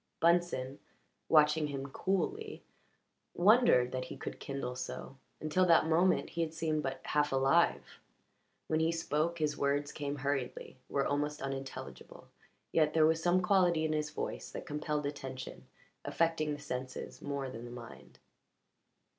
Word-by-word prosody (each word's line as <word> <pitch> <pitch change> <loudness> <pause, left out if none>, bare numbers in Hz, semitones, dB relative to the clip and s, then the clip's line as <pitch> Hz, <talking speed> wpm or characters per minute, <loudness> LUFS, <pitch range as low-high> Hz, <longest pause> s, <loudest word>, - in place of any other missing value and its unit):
Bunsen, 165 -6 +2 0.5
watching 150 0 +5
him 135 -1 -4
coolly, 390 - -2 0.7
wondered 195 - +5
that 130 0 -3
he - - -8
could - - -6
kindle 135 -3 -4
so; 130 +1 -6 0.2
until 155 +4 +1
that 165 -2 +6
moment 170 +3 +2
he 170 - -2
had 160 -1 -2
seemed 155 -1 0
but 135 -2 -4
half 150 0 +1
alive. 135 0 +2 0.7
When 155 - 0
he 160 +1 +2
spoke 165 0 -1
his 150 -2 0
words 145 +1 0
came 145 -1 -4
hurriedly 135 -2 -3
were 140 -1 +1
almost 145 +1 -1
unintelligible; 135 0 -7 0.4
yet 155 -1 +2
there 155 -1 +6
was 160 +1 +2
some 180 +2 +3
quality 180 -4 +3
in 155 - 0
his 150 -1 -1
voice 150 - -5
that - - -7
compelled 150 0 -2
attention, 135 -3 -6 0.4
affecting 165 -2 0
the 145 - -6
senses 130 -3 -6
more 140 -2 -3
than 120 -1 -8
the - - -8
mind. 120 -1 -11
150 Hz, 145 wpm, -33 LUFS, 135-165 Hz, 0.7 s, that